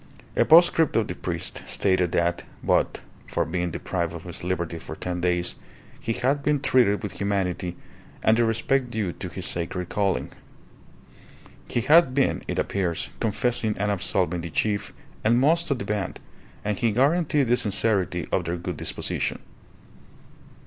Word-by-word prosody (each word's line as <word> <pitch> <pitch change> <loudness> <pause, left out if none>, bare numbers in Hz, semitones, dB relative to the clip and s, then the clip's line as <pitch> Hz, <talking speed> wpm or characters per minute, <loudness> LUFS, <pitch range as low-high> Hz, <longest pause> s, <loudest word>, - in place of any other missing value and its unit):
A - - +4
postscript 165 -1 +6
of 115 -2 +2
the - - -3
priest 85 -1 -3
stated 95 -3 +2
that, 85 0 +1 0.2
but - - +1 0.3
for 85 - 0
being 90 +2 -2
deprived 85 0 -3
of 85 - -8
his 90 -2 -7
liberty 85 -2 -2
for 80 - -8
ten 90 +1 -4
days, 90 0 +1 0.5
he 115 - -2
had 140 +5 +1
been 145 0 +1
treated 125 -6 +3
with 105 - -3
humanity 90 -3 -1 0.5
and 110 - +5
the 120 - +3
respect 120 +3 +1
due 110 -6 -2
to 90 - -6
his 90 0 -6
sacred 90 +1 -3
calling. 100 -2 0 1.4
He 120 - 0
had 150 0 +5
been, 140 - +2
it - - -3
appears, 90 -4 -1
confessing 115 0 +1
and 105 +1 0
absolving 90 -2 0
the 85 - -5
chief 100 +4 -1 0.3
and 115 +3 +4
most 165 +5 +3
of 140 - +1
the 100 - -5
band, 105 -2 -2 0.5
and 105 0 0
he 115 - +2
guaranteed 145 +4 +2
the 120 0 +3
sincerity 100 -5 +1
of 90 - +1
their 85 +1 -2
good 85 - -5
disposition. - - -2
100 Hz, 160 wpm, -25 LUFS, 90-120 Hz, 1.4 s, postscript